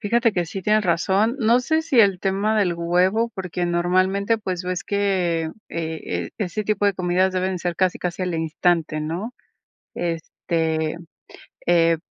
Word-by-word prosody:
Fíjate 230 +2 +2
que 175 -3 -1
sí 190 +3 -6
tienen 215 +2 +3
razón. 195 +6 +1
No 235 0 +4
sé 315 +5 +1
si 300 -7 +4
el 195 -4 +4
tema 200 +3 +1
del 185 -4 +2
huevo, 180 +7 +1
porque 180 -2 -3
normalmente, 185 +5 +1
pues 185 -4 -3
ves 180 -1 -2
que, 180 -5 0 0.2
eh, 160 - -4
e - - -22
ese 210 +1 -2
tipo 205 0 +1
de 200 - +2
comidas 185 +1 +1
deben 185 0 -1
ser 175 -1 -3
casi, 185 -1 +1
casi 180 +1 -3
al 180 -2 -1
instante, 160 -1 0
¿no? 175 +10 -4 0.6
Este, 160 -1 -2 0.7
eh, 165 -1 +4
185 Hz, 160 wpm, -22 LUFS, 170-205 Hz, 0.7 s, No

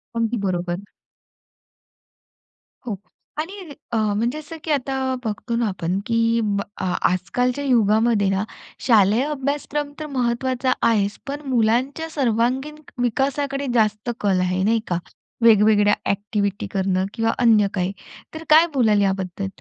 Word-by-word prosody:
अगदी 230 +1 0
बरोबर. 175 0 -2 2.1
हो 210 - -2 0.4
आणि 365 +1 -5 0.2
अ, - - +2
म्हणजे 220 +6 0
असं 315 +2 -9
की 315 - -2
आता 270 -1 0 0.3
बघतो 225 +2 -3
ना 235 -2 +1
आपण 185 0 -2
की 230 0 +2
ब 200 -1 0 0.2
आ 185 -1 -1 0.2
आजकालच्या 245 +10 -1
युगामध्ये 220 -3 +3
ना, 195 +1 0 0.4
शालेय 220 +1 +5
अभ्यासक्रम 290 0 -2
तर 310 - -4
महत्त्वाचा 255 +1 0 0.2
आहेच 205 -2 +1
पण 285 +2 -4
मुलांच्या 255 +7 +1
सर्वांगीण 260 +2 0 0.3
विकासाकडे 275 +3 -1
जास्त 215 0 +1
कल 195 -3 +2
आहे 185 +1 0
नाही 225 +2 +3
का? 175 - 0 0.4
वेगवेगळ्या 210 -2 +5 0.2
एक्टिविटी 200 0 -2
करणं 190 -1 0
किंवा 225 -1 +1
अन्य 220 -4 +5
काही 185 0 -1 0.4
तर 320 +1 -7
काय 320 +3 +7
बोलाल 215 -6 +3
याबद्दल? 190 0 -1
230 Hz, 130 wpm, -22 LUFS, 200-265 Hz, 2.1 s, काय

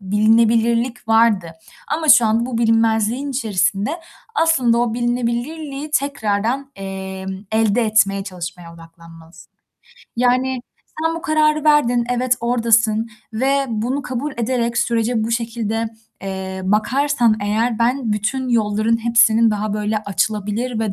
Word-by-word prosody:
bilinebilirlik 225 +4 +2
vardı 225 -6 +3 0.5
ama 315 -1 -4
şu 240 -5 +7
an 225 +2 +1
bu 245 -3 -3
bilinmezliğin 225 +3 +1
içerisinde, 210 -4 0 0.4
aslında 265 - +2
o 235 -2 0
bilinebilirliği 250 +5 -3
tekrardan, 265 -2 -1
emm, 190 0 -6 0.2
elde 220 +1 +2
etmeye 200 -2 +2
çalışmaya 175 -2 -8
odaklanmalısın. 165 0 -16 0.6
Yani, 250 +1 +1 0.4
sen 325 0 +1
bu 330 - -7
kararı 310 -2 +1
verdin, 245 -6 +3
evet 245 0 +1
oradasın 230 -2 +2 0.2
ve 270 +5 +1
bunu 240 +5 -2
kabul 270 +2 -4
ederek 235 0 -1
sürece 235 -1 0
bu 225 - -3
şekilde, 230 -1 -2 0.3
eee, 190 -1 -5
bakarsan 235 +4 +1
eğer 220 +3 0
ben 235 -1 0
bütün 245 +5 -2
yolların 220 -1 +1
hepsinin 230 -1 +4
daha 210 0 -2
böyle 210 +1 -1
açılabilir 215 +3 -2
ve 220 -3 -1
230 Hz, 120 wpm, -19 LUFS, 210-250 Hz, 0.6 s, şu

